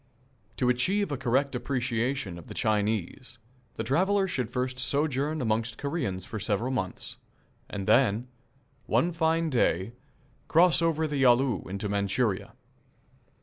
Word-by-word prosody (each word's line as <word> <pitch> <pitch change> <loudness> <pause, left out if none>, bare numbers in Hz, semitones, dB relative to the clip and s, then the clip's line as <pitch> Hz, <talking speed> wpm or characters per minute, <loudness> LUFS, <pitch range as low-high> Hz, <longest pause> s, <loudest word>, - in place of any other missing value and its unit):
To 125 - +1
achieve 185 +10 +1
a - - 0
correct 135 +2 0
appreciation 125 -5 -2
of 85 - -13
the - - -9
Chinese 110 +3 -1 0.4
the - - -3
traveller 190 +7 +2
should 130 -10 -2
first 125 0 -2
sojourn 145 +2 0
amongst 110 -1 0
the - - -13
Koreans 100 - -2
for 110 - -6
several 110 +5 0
months, 95 -8 -3 0.5
and 100 -2 -4
then, 120 0 +3 0.6
one 175 - +2
fine 165 -1 +1
day, 105 -4 +1 0.5
cross 170 -2 +5
over 160 -1 +1
the 150 -2 -2
Yalu 125 -2 +3
into 100 +2 -3
Manchuria. 100 +1 -1
125 Hz, 135 wpm, -28 LUFS, 110-145 Hz, 0.6 s, cross